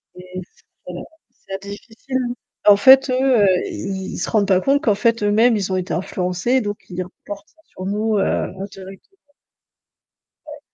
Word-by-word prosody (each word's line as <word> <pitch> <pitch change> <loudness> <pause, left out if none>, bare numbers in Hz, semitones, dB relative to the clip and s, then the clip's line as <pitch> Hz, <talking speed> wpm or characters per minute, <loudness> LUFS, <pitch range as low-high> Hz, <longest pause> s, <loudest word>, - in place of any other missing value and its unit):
et 180 0 -9
s 180 - -18 0.2
voilà, - - -7 0.3
c'est 195 0 -9
difficile, 220 +6 -6
hein. - - -3 0.3
En 205 - +9
fait 265 +5 +7
eux, - - +1 0.3
heu, - - +5 0.2
ils 190 0 -5
ils - - -5
se - - -3
rendent 210 -3 +2
pas 190 -2 +4
compte 275 +6 +2
qu'en 215 - +3
fait 230 +1 +1
eux-mêmes 220 +3 +4
ils 195 -2 -2
ont 185 - +1
été 185 +1 -3
influencés 180 +7 0
donc 205 -2 -3
ils 180 0 -3
reportent 200 +2 -10
ça 320 - -29
sur 185 - -9
nous 210 +2 0
heu, - - +2
indirectement. 195 - -5 1.3
Ouais. 300 -1 -9
200 Hz, 180 wpm, -20 LUFS, 190-230 Hz, 1.3 s, En